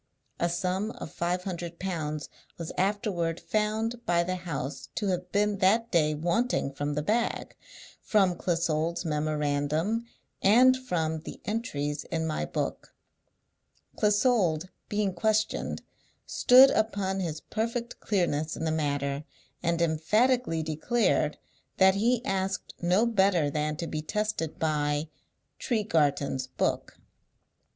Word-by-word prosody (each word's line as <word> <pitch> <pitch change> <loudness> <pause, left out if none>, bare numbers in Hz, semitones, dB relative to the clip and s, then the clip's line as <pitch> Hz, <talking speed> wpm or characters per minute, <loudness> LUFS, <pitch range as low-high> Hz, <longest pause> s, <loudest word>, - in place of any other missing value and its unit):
A 170 - +1
sum 185 +4 -1
of - - -7
five 180 +1 -1
hundred 175 -2 -5
pounds 155 -5 -3 0.3
was 165 -2 -5
afterward 185 -4 0
found 220 +2 -1
by 170 -3 +2
the 185 +2 -2
house 165 -5 -5
to 205 -3 -1
have 180 -1 -2
been 205 0 +1
that 225 +5 +3
day 155 -3 +3
wanting 170 - 0
from 145 +1 -2
the 150 - -1
bag, 230 +7 -1 0.5
from 195 -4 +3
Clissold's 170 -1 -1
memorandum, 155 +7 0 0.3
and 250 +6 +6
from 165 -11 -2
the 155 - -9
entries 150 - -2
in 160 -1 -2
my 155 - -1
book. - - -4 1.0
Clissold, 205 -6 +2 0.2
being 205 -2 0
questioned, 215 +4 0 0.4
stood 260 +2 +7
upon 200 -3 0
his 160 -4 -3
perfect 230 +4 -3
clearness 160 -6 0
in - - -4
the 160 - +1
matter, 145 -2 -1 0.4
and 170 0 +1
emphatically 170 +4 +2
declared 155 0 +1 0.4
that 190 0 +6
he 235 +4 +1
asked 195 0 -2
no 180 +6 +3
better 190 -9 +2
than 150 +1 -1
to 170 +2 -4
be 155 -2 -3
tested 210 -1 -2
by 150 -1 0 0.5
'Tregarthen's 145 - 0
book.' 130 - -2
175 Hz, 125 wpm, -28 LUFS, 155-210 Hz, 1.0 s, stood